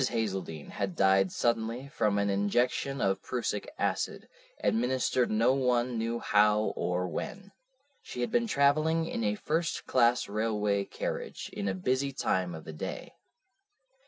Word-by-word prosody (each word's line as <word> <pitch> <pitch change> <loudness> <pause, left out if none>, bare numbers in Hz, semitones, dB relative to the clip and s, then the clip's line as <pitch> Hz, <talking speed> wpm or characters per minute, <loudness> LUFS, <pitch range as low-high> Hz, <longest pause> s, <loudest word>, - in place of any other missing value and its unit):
Hazeldene 95 -9 -3
had 100 -3 -3
died 95 -1 +4
suddenly 115 +2 -1
from 105 -9 +1
an 100 0 +1
injection 120 +7 0
of 95 0 +1
prussic 115 -4 -3
acid, - - -2 0.4
administered 125 +1 +1
no 115 +4 +3
one 125 -2 +1
knew 115 +1 -1
how 105 -1 +3
or 90 +1 -1
when. 200 - -6 0.5
She 125 - -6
had 120 - -1
been 235 -1 +2
travelling 155 0 +3
in 115 - -3
a 105 -1 +1
first 165 +8 -1
class 120 -1 +3
railway 105 -1 0
carriage - - -5
in 100 - -3
a 95 - 0
busy 130 +8 0
time 90 -9 -1
of 80 - -9
the 80 - -8
day. 75 - -6
115 Hz, 145 wpm, -30 LUFS, 100-130 Hz, 0.5 s, died